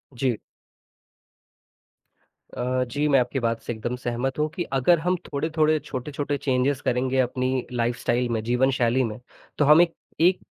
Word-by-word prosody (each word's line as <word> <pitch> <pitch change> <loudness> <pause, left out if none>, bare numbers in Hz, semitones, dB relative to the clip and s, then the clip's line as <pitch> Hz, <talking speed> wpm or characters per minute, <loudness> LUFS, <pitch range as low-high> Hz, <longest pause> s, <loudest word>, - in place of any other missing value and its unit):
जी। 120 -3 0 2.2
अ, 125 +1 0
जी 145 +5 -1
मैं 140 -2 +5
आपकी 125 +2 -1
बात 115 -1 -1
से 120 - -4
एकदम 120 +3 -4
सहमत 125 +3 -3
हूँ 155 - +2
कि 175 - -1
अगर 155 +6 +4
हम 180 +2 +1
थोड़े-थोड़े, 155 +1 +1
छोटे-छोटे 145 +1 -4
चेंजेस 135 0 0
करेंगे 130 +1 0
अपनी 130 0 0
लाइफ़स्टाइल 120 0 0
में, 115 -2 -1
जीवनशैली 125 +1 +2
में, 110 0 -4 0.4
तो 145 - +3
हम 155 +3 +7
एक 170 -1 +2 0.3
एक 180 +2 +4
130 Hz, 150 wpm, -24 LUFS, 120-145 Hz, 2.2 s, हम